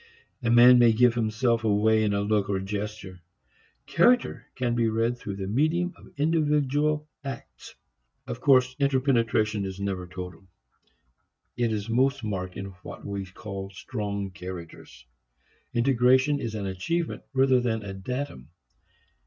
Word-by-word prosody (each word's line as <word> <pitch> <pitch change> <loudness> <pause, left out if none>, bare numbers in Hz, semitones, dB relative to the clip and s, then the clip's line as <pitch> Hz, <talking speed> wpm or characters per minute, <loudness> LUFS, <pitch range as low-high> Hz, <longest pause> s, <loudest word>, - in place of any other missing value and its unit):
A 120 - -1
man 120 +1 +8
may 120 -2 +6
give 120 +1 +4
himself 115 0 0
away 110 +1 +3
in 105 -1 +1
a 100 0 0
look 105 -1 0
or 100 - +1
a 95 - -4
gesture. 100 -2 -5 0.6
Character 235 - +2
can 120 -2 -1
be 115 -1 +2
read 115 +2 0
through 105 -5 -6
the 95 -1 -5
medium 155 - +1
of - - -16
individual 150 -1 +1 0.2
acts. 135 -3 -9 0.5
Of - - -6
course 130 -2 +4
interpenetration 120 -6 +1
is 95 0 -5
never 95 -2 -3
total. 90 +1 -9 1.1
It 120 -1 0
is 105 -1 -3
most 130 +3 +1
marked 95 -3 -4
in 100 0 -6
what - - -10
we 100 -1 -4
call 95 +1 -7
strong 100 -1 -4
characters. 90 -8 -10 0.7
Integration 130 +3 +3
is 115 -5 -4
an 100 -2 -3
achievement 95 - -2
rather 130 -1 +4
than 110 -3 -1
a 100 -1 -6
datum. 95 - -5
115 Hz, 145 wpm, -26 LUFS, 100-130 Hz, 1.1 s, man